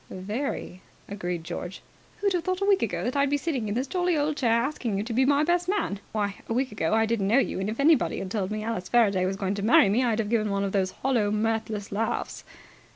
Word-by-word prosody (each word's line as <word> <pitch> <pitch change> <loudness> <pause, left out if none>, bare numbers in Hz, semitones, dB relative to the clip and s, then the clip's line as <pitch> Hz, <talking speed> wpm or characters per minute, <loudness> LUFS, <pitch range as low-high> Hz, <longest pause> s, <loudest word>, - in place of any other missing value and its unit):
"Very," 200 0 -4 0.3
agreed 180 -4 -4
George. 175 +2 -6 0.3
"Who'd 400 -1 0
have 350 -2 0
thought, 370 0 -1
a 395 - 0
week 400 -1 +3
ago, - - -1
that 250 - -2
I'd 280 0 +2
be 290 - +2
sitting 275 -7 -2
in 205 - -2
this 255 +3 0
jolly 355 +2 0
old 295 +1 0
chair 245 -5 +1
asking 235 -3 0
you 200 - -1
to 230 +1 -5
be 260 +3 +3
my 285 +2 +3
best 350 +2 +1
man? 390 - -1
Why, 205 -2 -2
a - - 0
week 255 +1 0
ago 210 -1 0
I 225 0 +3
didn't 220 -3 0
know 225 +5 +4
you, 275 - +1
and, 195 +2 -2
if 225 - -5
anybody 305 +2 +3
had 185 - -5
told 200 -3 -1
me 215 0 -3
Alice 215 -5 -4
Faraday 200 -6 +3
was 195 +1 -2
going 195 -1 -1
to 200 - -4
marry 210 -1 +5
me, 230 +6 +2
I'd 230 -3 +1
have 220 -1 -2
given 215 -3 +1
one 200 0 0
of 195 - -1
those 190 -2 +1
hollow, 230 0 0
mirthless 215 -1 -2
laughs." 220 +3 -2
225 Hz, 255 wpm, -26 LUFS, 200-275 Hz, 0.3 s, marry